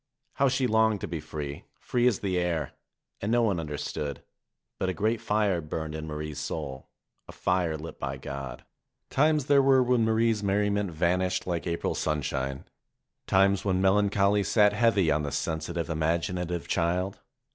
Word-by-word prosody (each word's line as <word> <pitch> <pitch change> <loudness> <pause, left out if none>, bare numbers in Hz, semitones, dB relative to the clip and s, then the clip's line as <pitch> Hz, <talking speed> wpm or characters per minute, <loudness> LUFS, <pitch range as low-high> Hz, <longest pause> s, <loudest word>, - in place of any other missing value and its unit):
How 140 0 +4
she 130 0 +1
longed 110 -2 +3
to - - -3
be 85 0 -4
free, 75 -2 -6
free 125 0 +1
as 120 -6 +1
the 95 -3 0
air! 85 -5 -1 0.5
And 105 - -1
no 120 0 +3
one 100 -6 +1
understood. 75 -2 -4 0.6
But 95 - 0
a 95 - -2
great 110 +6 0
Are 105 -4 +2
burned 75 0 -4
in 80 0 -5
Marie's 75 -1 -5
soul, 65 0 -5 0.4
a - - -9
Are 90 -4 +2
lit 80 +2 -9
by 70 0 -3
God. 70 0 -7 0.5
Times 150 0 +3
there 140 -1 +5
were 135 -1 +5
when 125 -2 +2
Marie's 110 -1 +2
merriment 100 0 +1
vanished 90 +3 0
like 85 -1 -2
April 85 0 -1
sunshine, 70 -3 -2 0.6
times 95 0 +3
when 95 -2 +1
melancholy 100 +1 +3
sat 105 0 +4
heavy 105 -6 +3
on 75 +1 +2
the 75 -1 -3
sensitive, 80 +3 -2
imaginative 85 +2 -1
child. 90 +3 0
90 Hz, 160 wpm, -28 LUFS, 80-105 Hz, 0.6 s, there